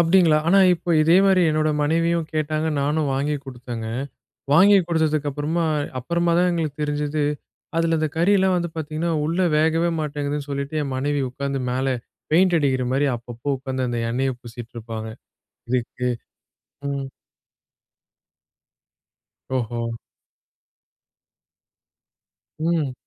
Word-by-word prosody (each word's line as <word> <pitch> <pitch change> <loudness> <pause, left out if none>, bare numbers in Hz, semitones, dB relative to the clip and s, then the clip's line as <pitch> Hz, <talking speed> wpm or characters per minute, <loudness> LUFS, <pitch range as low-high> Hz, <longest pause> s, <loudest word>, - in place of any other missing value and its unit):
அப்டிங்களா? 165 -2 +5
ஆனா, 190 +4 +5 0.2
இப்போ 175 +1 -5
இதே 165 +3 +5
மாரி 190 -2 +4
என்னோட 155 0 +1
மனைவியும் 165 +2 +1
கேட்டாங்க. 155 0 0
நானும் 150 +1 0
வாங்கி 145 +2 0
குடுத்தேங்க. 120 -3 -6 0.7
வாங்கி 195 +7 +7
குடுத்ததுக்கு 155 -3 +1
அப்புறமா 150 +4 -1 0.3
அப்புறமா 170 +6 0
தான் 180 +1 +4
எங்களுக்கு 155 -4 -2
தெரிஞ்சுது, 150 0 -1 0.5
அதில 165 0 +2
அந்த 155 - +1
கறியெல்லாம் 190 +2 +3
வந்து 170 -1 -2
பாத்தீங்கன்னா, 155 +2 -2
உள்ளே 170 +4 +1
வேகவே 160 +2 +2
மாட்டேங்குதுன்னு 145 -1 -3
சொல்லிட்டு, 140 +2 -3
என் 135 -2 -4
மனைவி 145 +2 0
உக்காந்து 140 +1 -3
மேல 130 +1 0 0.4
பெயிண்ட் 175 +2 +4
அடிக்கிற 135 -4 +1
மாரி 140 +2 +2
அப்பப்போ 120 +4 -4
உக்காந்து 130 -1 -3
அந்த 120 -1 -2
எண்ணெய 130 +3 0
பூசிக்கிட்டு 120 0 -10
இருப்பாங்க 110 -1 -6 0.6
இதுக்கு. 125 0 -1 0.8
ம். 140 -1 -3 2.5
ஓஹோ! 120 -1 -2 2.7
ம். 160 -4 0
150 Hz, 115 wpm, -23 LUFS, 135-165 Hz, 2.7 s, வாங்கி